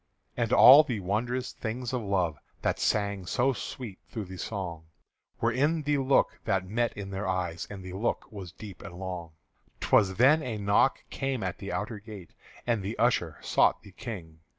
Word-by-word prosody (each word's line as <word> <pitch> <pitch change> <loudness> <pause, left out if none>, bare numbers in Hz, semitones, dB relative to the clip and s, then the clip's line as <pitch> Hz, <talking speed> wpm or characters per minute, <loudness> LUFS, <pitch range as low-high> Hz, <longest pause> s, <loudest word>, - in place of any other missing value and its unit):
And 115 -1 -1
all 135 +4 +10
the 125 -8 -3
wondrous 120 +7 -1
things 120 +2 -4
of 125 - 0
love 95 -7 0 0.2
That - - 0
sang 100 -3 0
so 130 +6 +2
sweet 115 -3 -7
through 110 -3 -5
the 95 0 -9
song 85 -6 -5 0.5
Were - - +2
in 150 +4 +1
the 145 0 +1
look 135 0 +2
that 95 -1 +1
met 120 +3 0
in 100 -1 -6
their 95 +1 -3
eyes, 90 -3 -2
And 100 -2 -8
the 90 0 -7
look 105 +5 -1
was 95 -5 -8
deep 100 -1 -10
and 85 - -9
long. 90 -3 -6 0.5
'T - - -4
was 95 -3 +5
then 140 +8 +5
a 120 -6 -3
knock 100 +6 +2
came 135 -5 -2
at 95 -2 -3
the 100 - -5
outer 105 0 -3
gate, 100 -5 -11 0.3
And 115 -4 +1
the 100 +4 -4
usher 90 - +1
sought - - +3
the 100 - -13
King. 90 -7 -8
105 Hz, 190 wpm, -29 LUFS, 95-120 Hz, 0.5 s, all